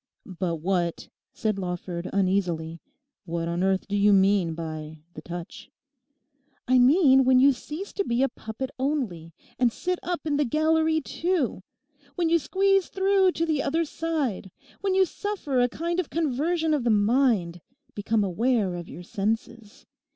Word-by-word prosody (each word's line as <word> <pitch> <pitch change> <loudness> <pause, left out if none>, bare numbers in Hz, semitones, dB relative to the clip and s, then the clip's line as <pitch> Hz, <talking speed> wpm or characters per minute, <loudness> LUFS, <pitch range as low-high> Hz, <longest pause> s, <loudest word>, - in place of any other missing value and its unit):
'But 180 -3 -3
what,' 170 +1 -2 0.2
said 215 -3 -2
Lawford 180 -1 -4
uneasily, 180 -4 -1 0.4
'what 170 -1 -3
on 170 +1 -2
earth 190 0 +1
do 200 - -2
you 205 +1 +4
mean 190 -4 +3
by 155 -1 -7
the 155 - -9
touch?' 175 +8 -8 1.0
'I 255 0 +4
mean 265 0 +6
when 255 0 +5
you 275 +1 +6
cease 305 +10 -8
to 400 - -1
be 240 -5 0
a - - +4
puppet 230 +5 -6
only 245 - -2 0.3
and 245 -2 +3
sit 360 +8 -3
up 355 -1 -3
in 295 -2 0
the 295 - +3
gallery 315 +3 +2
too. 325 - -1 0.5
When 340 -2 +1
you 335 0 +4
squeeze 390 +5 +1
through 385 -1 +2
to 330 - -1
the 310 -3 0
other 325 +5 0
side. 295 - -3 0.3
When 390 -1 0
you 380 0 +5
suffer 360 -8 -3
a 245 0 +3
kind 340 +6 -2
of 360 - -2
conversion 320 +2 0
of 290 -5 0
the 240 - +1
mind; 210 -5 +2 0.3
become 210 +1 0
aware 205 +1 0
of 175 -1 -7
your 180 - -9
senses. 215 +3 -4
245 Hz, 160 wpm, -26 LUFS, -, 1.0 s, mean